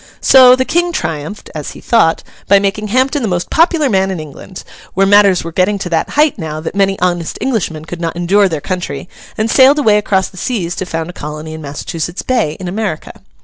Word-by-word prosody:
So, 255 -1 +7
the 260 0 -1
King 345 +4 0
triumphed 160 - -5
(as 150 -2 -6
he - - -12
thought), 220 -9 +2 0.2
by 200 - +6
making 200 +2 -1
Hampden 260 +6 +1
the 230 - -1
most 175 -2 -2
popular 330 -2 +3
man 190 -5 +1
in 185 -3 -3
England; 155 +5 -10 0.3
where 195 +1 +3
matters 200 -2 +4
were 165 - -6
getting 185 +4 +1
to 190 -2 -5
that 165 - 0
height 300 0 +3
now, 155 -1 -5
that 160 - -5
many 195 0 +1
honest 175 -2 -1
Englishmen 170 -12 -2
could 175 +1 -7
not 165 -1 -3
endure 190 +3 +2
their 160 -4 -3
country, 175 -5 -4 0.3
and 220 - 0
sailed 265 +4 +5
away 215 -8 +3
across 190 -2 0
the 185 - -17
seas 180 -5 -2
to 185 - -4
found 165 0 -4
a - - -21
colony 155 +1 -7
in 160 - -8
Massachusetts 160 +4 -5
Bay 225 -12 0
in 185 - -6
America. 195 -3 -4
190 Hz, 215 wpm, -14 LUFS, 165-220 Hz, 0.3 s, So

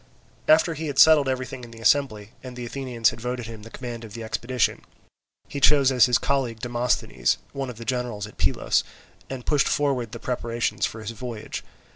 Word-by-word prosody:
After 160 +2 +5
he 160 +1 -4
had 140 -2 -4
settled 150 -3 +7
everything 130 -1 -3
in 120 - -9
the 115 0 -12
assembly, 115 -4 +2
and 130 -1 -9
the 125 -1 -5
Athenians 120 -3 0
had 115 - -10
voted 125 0 -3
him 110 -1 -8
the 115 - -11
command 120 -1 -7
of 110 -2 -10
the 115 - -6
expedition, 115 +2 0 0.7
he 140 - -5
chose 140 -1 +5
as 125 -1 +6
his 125 -1 +4
colleague 130 -5 -1
Demosthenes, 120 - 0 0.2
one 135 -1 -3
of 120 - -8
the 115 - -8
generals 120 -4 -2
at 105 - -13
Pylos, - - +2 0.5
and 130 -2 -6
pushed 145 -2 +3
forward 135 -6 0
the - - -6
preparations 115 -4 -1
for 110 - -9
his 110 - -5
voyage. 115 -1 -6
125 Hz, 195 wpm, -25 LUFS, 115-135 Hz, 0.7 s, settled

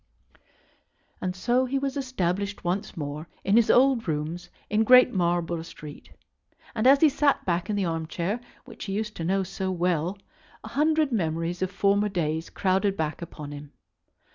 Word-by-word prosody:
"] - - -40
And 185 0 -2
so 240 +7 +1
he 265 +2 -1
was 270 0 -2
established 200 -7 -2
once 185 +3 -2
more 150 +1 -5 0.2
in 195 - +2
his 230 -1 +4
old 255 -4 +4
rooms 160 +3 -3 0.2
in 215 +2 +2
Great 255 +2 +7
Marlborough 175 -2 0
Street; 150 -2 -11 0.6
and 230 +2 +1
as 275 +1 +6
he 320 - +8
sat 285 0 +1
back 175 +2 -1
in 210 - 0
the 200 -2 0
arm 165 -1 -2
chair, 185 +8 -2 0.3
which 235 -4 -9
he 195 - -4
used 210 +1 -3
to 165 - -4
know 190 +3 +1
so 190 +1 -4
well, 180 0 0 0.5
a - - -8
hundred 305 0 +2
memories 170 -3 -1
of 185 - 0
former 200 +2 +2
days 160 -4 -2
crowded 195 +1 0
back 155 +1 -2
upon 150 -3 -8
him. 145 0 -10
190 Hz, 175 wpm, -26 LUFS, 170-225 Hz, 0.6 s, he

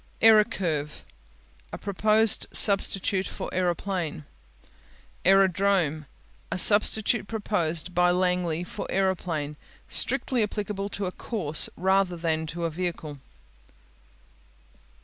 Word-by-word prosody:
Aerocurve 195 -9 +2 0.7
A - - -6
proposed 215 +2 +3
substitute 195 -1 +1
for - - -7
aeroplane. 175 -3 -3 1.0
Aerodrome 190 -5 +2 0.4
A - - -2
substitute 210 +3 +4
proposed 180 -6 -2
by 180 0 +3
Langley 180 -2 0
for 180 - -7
aeroplane. 170 -6 -2 0.3
Strictly 250 -3 -1
applicable 205 -1 -3
to 200 -1 -5
a 180 - -3
course 170 -9 0
rather 190 -1 +1
than 160 -1 -2
to 170 +2 -6
a 165 - -2
vehicle. 160 -4 -5
185 Hz, 95 wpm, -25 LUFS, 165-200 Hz, 1.0 s, substitute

